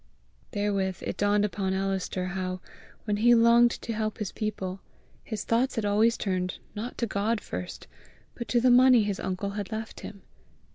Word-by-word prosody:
Therewith 200 Hz, -3 st, -1 dB
it -, -, -3 dB
dawned 205 Hz, 0 st, +2 dB
upon 190 Hz, -2 st, -2 dB
Alister 190 Hz, -1 st, -2 dB
how, 185 Hz, -1 st, -3 dB, 0.4 s
when 210 Hz, -2 st, -1 dB
he 240 Hz, +3 st, +5 dB
longed 235 Hz, +1 st, +6 dB
to 230 Hz, -, -3 dB
help 215 Hz, 0 st, -2 dB
his 210 Hz, -3 st, -4 dB
people, 195 Hz, -3 st, -4 dB, 0.4 s
his 215 Hz, -3 st, -5 dB
thoughts 240 Hz, +4 st, +1 dB
had 225 Hz, -3 st, -1 dB
always 215 Hz, +3 st, +3 dB
turned, 185 Hz, -2 st, -2 dB, 0.2 s
not 220 Hz, +4 st, -6 dB
to 235 Hz, -, 0 dB
God 215 Hz, +1 st, 0 dB
first, 90 Hz, -, -7 dB, 0.5 s
but 235 Hz, -, -6 dB
to 240 Hz, -, +2 dB
the 250 Hz, +1 st, +4 dB
money 250 Hz, -2 st, +7 dB
his 205 Hz, -2 st, -2 dB
uncle 190 Hz, +2 st, -3 dB
had 205 Hz, +1 st, -5 dB
left 220 Hz, 0 st, -5 dB
him. 200 Hz, -, -10 dB
210 Hz, 175 wpm, -27 LUFS, 190-230 Hz, 0.5 s, money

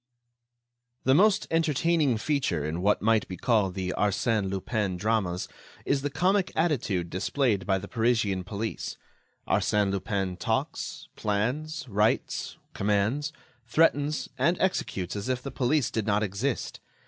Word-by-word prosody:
The 130 Hz, -, +4 dB
most 200 Hz, +6 st, +4 dB
entertaining 165 Hz, -4 st, +2 dB
feature 110 Hz, -, 0 dB
in 80 Hz, +3 st, -2 dB
what 105 Hz, +2 st, +2 dB
might 110 Hz, -1 st, +3 dB
be 90 Hz, -, -6 dB
called 100 Hz, -3 st, +1 dB
the 90 Hz, -1 st, -2 dB
Arsène 105 Hz, 0 st, +1 dB
Lupin 95 Hz, 0 st, -1 dB
dramas 95 Hz, -3 st, 0 dB, 0.4 s
is 140 Hz, -1 st, +1 dB
the 145 Hz, -, -1 dB
comic 185 Hz, +6 st, +1 dB
attitude 115 Hz, -, 0 dB
displayed 105 Hz, +1 st, 0 dB
by 95 Hz, -1 st, +3 dB
the 100 Hz, +1 st, -7 dB
Parisian 110 Hz, -5 st, +1 dB
police. 105 Hz, +4 st, -4 dB, 0.5 s
Arsène 105 Hz, -2 st, +2 dB
Lupin 95 Hz, -2 st, -2 dB
talks, -, -, -2 dB
plans, 125 Hz, +10 st, -1 dB
writes, 105 Hz, 0 st, 0 dB, 0.2 s
commands, 105 Hz, +9 st, 0 dB, 0.4 s
threatens 150 Hz, +2 st, +2 dB
and 170 Hz, +7 st, +2 dB
executes 100 Hz, -, -1 dB
as 100 Hz, +4 st, -4 dB
if 125 Hz, -1 st, -1 dB
the 140 Hz, -, -5 dB
police 130 Hz, +1 st, +1 dB
did 110 Hz, -1 st, -2 dB
not 105 Hz, 0 st, +2 dB
exist. 110 Hz, +6 st, -2 dB
110 Hz, 135 wpm, -27 LUFS, 100-140 Hz, 0.5 s, The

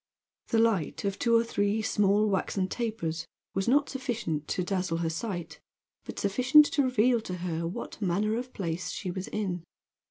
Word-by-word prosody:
The 230 Hz, -, +1 dB
light 220 Hz, -7 st, +1 dB
of 195 Hz, -1 st, -2 dB
two 235 Hz, -1 st, +3 dB
or 230 Hz, -, +5 dB
three 210 Hz, -1 st, 0 dB
small 210 Hz, 0 st, +3 dB
waxen 190 Hz, -1 st, 0 dB
tapers 175 Hz, -8 st, -3 dB, 0.3 s
was 195 Hz, +2 st, -1 dB
not 285 Hz, +4 st, +4 dB
sufficient 235 Hz, -, -3 dB
to 180 Hz, -, -1 dB
dazzle 180 Hz, -2 st, -1 dB
her 165 Hz, -1 st, -1 dB
sight; 175 Hz, 0 st, -4 dB, 0.5 s
but -, -, -7 dB
sufficient 255 Hz, +9 st, +5 dB
to 285 Hz, -, +3 dB
reveal 250 Hz, -2 st, +3 dB
to 180 Hz, -4 st, -5 dB
her 165 Hz, -1 st, -2 dB
what 180 Hz, +4 st, -6 dB
manner 205 Hz, +3 st, +1 dB
of 250 Hz, +2 st, -4 dB
place 175 Hz, -4 st, -3 dB
she 185 Hz, -, -4 dB
was 185 Hz, +1 st, -5 dB
in. 185 Hz, -5 st, -3 dB
200 Hz, 170 wpm, -29 LUFS, 180-230 Hz, 0.5 s, or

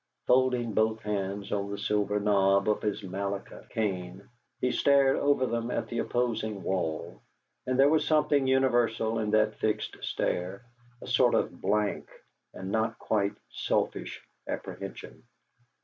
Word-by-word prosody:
Folding 125 Hz, -3 st, +2 dB
both 110 Hz, +1 st, +1 dB
hands 100 Hz, -1 st, -3 dB
on 100 Hz, -1 st, -1 dB
the 100 Hz, -, -4 dB
silver 105 Hz, 0 st, 0 dB
knob 100 Hz, -1 st, +3 dB
of 105 Hz, -, +1 dB
his 105 Hz, 0 st, -2 dB
Malacca 100 Hz, +1 st, -5 dB
cane, 95 Hz, -4 st, -3 dB, 0.3 s
he 125 Hz, -, +1 dB
stared 140 Hz, 0 st, +4 dB
over 145 Hz, -2 st, +2 dB
them 115 Hz, -1 st, -2 dB
at -, -, -2 dB
the 120 Hz, -, -2 dB
opposing 110 Hz, -5 st, -1 dB
wall; 85 Hz, -2 st, -2 dB, 0.5 s
and 130 Hz, 0 st, 0 dB
there 135 Hz, -, +7 dB
was 150 Hz, 0 st, +2 dB
something 150 Hz, -3 st, +3 dB
universal 120 Hz, -4 st, +2 dB
in 110 Hz, -1 st, -1 dB
that 110 Hz, 0 st, +2 dB
fixed 110 Hz, -1 st, -1 dB
stare, 95 Hz, +6 st, -2 dB, 0.4 s
a -, -, -9 dB
sort -, -, +4 dB
of -, -, -1 dB
blank 105 Hz, +1 st, 0 dB, 0.4 s
and 95 Hz, +1 st, -7 dB
not 110 Hz, +1 st, 0 dB
quite 100 Hz, -2 st, 0 dB, 0.2 s
selfish -, -, -2 dB, 0.3 s
apprehension. -, -, -7 dB
110 Hz, 140 wpm, -29 LUFS, 100-120 Hz, 0.5 s, there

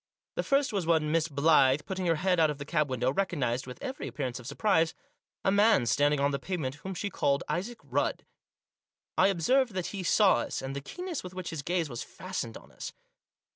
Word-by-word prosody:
The -, -, -1 dB
first 275 Hz, -3 st, +1 dB
was 190 Hz, -5 st, -1 dB
when 160 Hz, -2 st, +2 dB
Miss 165 Hz, 0 st, +2 dB
Blyth, 145 Hz, -2 st, +4 dB
putting 190 Hz, -1 st, -3 dB
her 165 Hz, -, +3 dB
head 180 Hz, +2 st, +1 dB
out 160 Hz, -1 st, +5 dB
of 150 Hz, -, -3 dB
the 140 Hz, -, -7 dB
cab 150 Hz, -2 st, +1 dB
window, 130 Hz, 0 st, 0 dB
recognised, 135 Hz, -10 st, -1 dB
with 125 Hz, -1 st, -8 dB
every 265 Hz, -, -4 dB
appear 140 Hz, -, -3 dB
ance 125 Hz, -1 st, -4 dB
of 125 Hz, -, -10 dB
surprise, 160 Hz, +2 st, +2 dB, 0.5 s
a 195 Hz, -, +4 dB
man 205 Hz, -, +5 dB
standing 145 Hz, +5 st, +3 dB
on 140 Hz, +1 st, +2 dB
the 140 Hz, -, -1 dB
pavement 160 Hz, -9 st, -3 dB
whom 190 Hz, 0 st, -5 dB
she 205 Hz, +3 st, -3 dB
called 140 Hz, -4 st, +1 dB
Isaac 220 Hz, +7 st, -2 dB
Rudd. -, -, -1 dB, 0.9 s
I -, -, +5 dB
observed 215 Hz, +6 st, +2 dB
that 185 Hz, +1 st, -3 dB
he 195 Hz, -, -3 dB
saw 190 Hz, +2 st, +4 dB
us, 120 Hz, -, -3 dB
and 135 Hz, +1 st, -5 dB
the 140 Hz, -, -3 dB
keenness 360 Hz, -, -5 dB
with 180 Hz, 0 st, -9 dB
which 185 Hz, -1 st, -5 dB
his 160 Hz, -3 st, -4 dB
gaze 170 Hz, +2 st, 0 dB
was 120 Hz, -3 st, -6 dB
fastened 185 Hz, -12 st, -5 dB
on -, -, -17 dB
us. -, -, -7 dB
165 Hz, 215 wpm, -29 LUFS, 140-190 Hz, 0.9 s, out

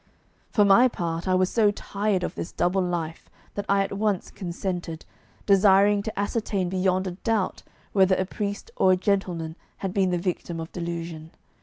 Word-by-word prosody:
For 210 Hz, -, +4 dB
my 200 Hz, +6 st, +7 dB
part, 170 Hz, -6 st, -3 dB
I 185 Hz, -, +3 dB
was 185 Hz, 0 st, +2 dB
so 220 Hz, -3 st, +4 dB
tired 205 Hz, -2 st, -1 dB
of -, -, -2 dB
this -, -, -5 dB
double 185 Hz, +2 st, +1 dB
life 170 Hz, -3 st, -3 dB, 0.2 s
that 205 Hz, -, -4 dB
I 200 Hz, 0 st, +4 dB
at 195 Hz, -, -5 dB
once 205 Hz, -2 st, -1 dB
consented, 175 Hz, -2 st, -4 dB, 0.4 s
desiring 200 Hz, +1 st, +5 dB
to 215 Hz, 0 st, -5 dB
ascertain 200 Hz, -3 st, -1 dB
beyond 185 Hz, 0 st, +1 dB
a 185 Hz, -, -2 dB
doubt 220 Hz, -5 st, 0 dB, 0.3 s
whether 190 Hz, -1 st, +5 dB
a 185 Hz, -, 0 dB
priest 205 Hz, -, -4 dB
or 185 Hz, -, +5 dB
a -, -, +2 dB
gentleman 180 Hz, -4 st, -1 dB, 0.3 s
had 185 Hz, -, -2 dB
been 195 Hz, -2 st, +2 dB
the 180 Hz, -, +1 dB
victim 175 Hz, -1 st, -3 dB
of 165 Hz, 0 st, -6 dB
delusion. 170 Hz, -2 st, -5 dB
190 Hz, 175 wpm, -25 LUFS, 175-200 Hz, 0.4 s, my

